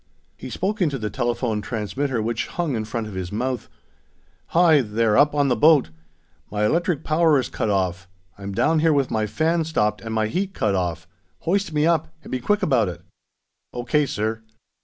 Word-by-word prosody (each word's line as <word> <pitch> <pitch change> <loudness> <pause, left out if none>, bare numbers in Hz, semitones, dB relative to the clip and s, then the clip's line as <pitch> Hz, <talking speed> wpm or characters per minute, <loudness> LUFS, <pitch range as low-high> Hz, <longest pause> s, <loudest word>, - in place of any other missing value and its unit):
He - - -9
spoke 205 +2 -2
into 150 -6 +1
the 105 -4 -4
telephone 120 -1 -1
transmitter, 115 +4 -2
which 115 0 -2
hung 165 -7 -2
in 110 -1 -2
front 110 +1 -3
of 105 - -8
his 95 -2 -5
mouth: 125 +2 -3 0.8
"Hi, 165 -4 +5
there, 110 -1 +1
up 145 +1 +4
on 145 -1 +3
the 125 - +2
boat! 145 - +4 0.6
My 105 0 0
electric 165 - 0
power 155 -1 +3
is 130 - -1
cut 110 - -2
off. 95 -2 -1 0.3
I'm 100 0 -7
down 160 +11 +2
here 160 0 +3
with 140 -2 +1
my 110 -1 0
fan 165 +7 +1
stopped 105 -10 0
and 110 - -6
my 110 -1 +1
heat 190 - -2
cut 105 -2 +1
off. 90 -2 -2 0.3
Hoist 195 +2 0
me 150 0 +1
up, 160 -1 +1
and - - -11
be 130 - -1
quick 205 - 0
about 120 -9 +2
it!" 85 - -8 0.7
"O.K., 140 +4 0
sir." 110 -1 -2
125 Hz, 190 wpm, -23 LUFS, 105-155 Hz, 0.8 s, Hi